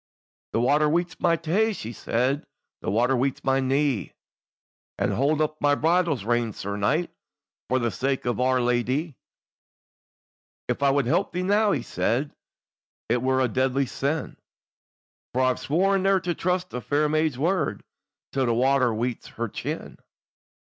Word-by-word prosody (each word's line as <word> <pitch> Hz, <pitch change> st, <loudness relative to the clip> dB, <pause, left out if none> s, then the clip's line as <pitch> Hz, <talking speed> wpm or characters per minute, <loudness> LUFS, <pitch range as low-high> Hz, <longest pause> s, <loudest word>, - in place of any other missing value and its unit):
"The -, -, +2 dB
water 145 Hz, +5 st, +3 dB
weets 175 Hz, +3 st, 0 dB
my 170 Hz, -, +3 dB
tae," 185 Hz, +8 st, +1 dB
she 115 Hz, -, -6 dB
said; 130 Hz, +6 st, 0 dB, 0.4 s
"The -, -, -3 dB
water 120 Hz, +6 st, +2 dB
weets 130 Hz, +2 st, -1 dB
my 135 Hz, 0 st, +2 dB
knee, 135 Hz, -5 st, 0 dB, 0.8 s
And -, -, 0 dB
hold 145 Hz, +4 st, +1 dB
up 155 Hz, 0 st, -1 dB
my 145 Hz, 0 st, +4 dB
bridle 165 Hz, 0 st, +2 dB
reins, 115 Hz, 0 st, -1 dB
sir 100 Hz, +1 st, -4 dB
knight, 150 Hz, -, 0 dB, 0.6 s
For 130 Hz, -, +2 dB
the 120 Hz, -2 st, 0 dB
sake 135 Hz, +3 st, -1 dB
of 120 Hz, 0 st, -1 dB
Our 130 Hz, 0 st, +3 dB
Ladye." 125 Hz, +6 st, 0 dB, 1.5 s
"If -, -, -2 dB
I 140 Hz, -, +4 dB
would 140 Hz, -1 st, +2 dB
help 150 Hz, +7 st, +1 dB
thee 180 Hz, +1 st, -1 dB
now," 205 Hz, +2 st, +3 dB
he 135 Hz, -10 st, 0 dB
said, 135 Hz, +6 st, -1 dB, 0.8 s
"It 120 Hz, +1 st, +2 dB
were 130 Hz, +1 st, +2 dB
a 130 Hz, -, +3 dB
deadly 130 Hz, +3 st, +1 dB
sin, 140 Hz, +5 st, -3 dB, 1.0 s
For 130 Hz, -, +3 dB
I've 130 Hz, -1 st, +1 dB
sworn 195 Hz, +6 st, +2 dB
neir 195 Hz, 0 st, +3 dB
to 175 Hz, -1 st, 0 dB
trust 180 Hz, +1 st, -1 dB
a 125 Hz, -, -3 dB
fair 145 Hz, +4 st, +1 dB
may's 155 Hz, -3 st, +1 dB
word, 165 Hz, +2 st, 0 dB, 0.5 s
Till 135 Hz, -2 st, 0 dB
the 115 Hz, -, +2 dB
water 130 Hz, 0 st, +3 dB
weets 115 Hz, +2 st, -3 dB
her 115 Hz, +1 st, -4 dB
chin." -, -, -6 dB
135 Hz, 160 wpm, -25 LUFS, 125-160 Hz, 1.5 s, my